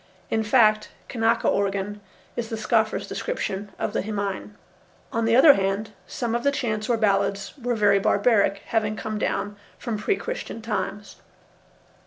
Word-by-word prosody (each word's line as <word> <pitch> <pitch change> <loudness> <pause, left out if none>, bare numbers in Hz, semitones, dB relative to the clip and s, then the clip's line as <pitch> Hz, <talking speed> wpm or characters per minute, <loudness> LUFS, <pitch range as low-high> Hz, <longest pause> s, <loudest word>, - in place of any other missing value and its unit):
In 220 - +2
fact, 215 -1 +3 0.2
"kanaka 230 -1 +1
organ" 200 +1 0 0.3
is 235 -2 -3
the 225 - -3
scoffer's 220 -1 +1
description 205 - -3
of - - -2
the - - 0
himine. 200 -1 -4 0.6
On 230 0 0
the 225 0 +3
other 280 +3 +9
hand, 195 +1 -1 0.2
some 235 -2 -3
of 235 - 0
the 280 - +3
chants 215 -5 -2
or 235 - +3
ballads 200 -2 +1
were 245 -3 -2
very 205 -2 +4
barbaric, 200 -1 +2
having 215 -2 0
come 215 0 -4
down 205 -1 -2 0.2
from 230 -4 -4
pre 385 - +1
Christian - - -5
times. 210 -2 -4
215 Hz, 155 wpm, -24 LUFS, 200-230 Hz, 0.6 s, other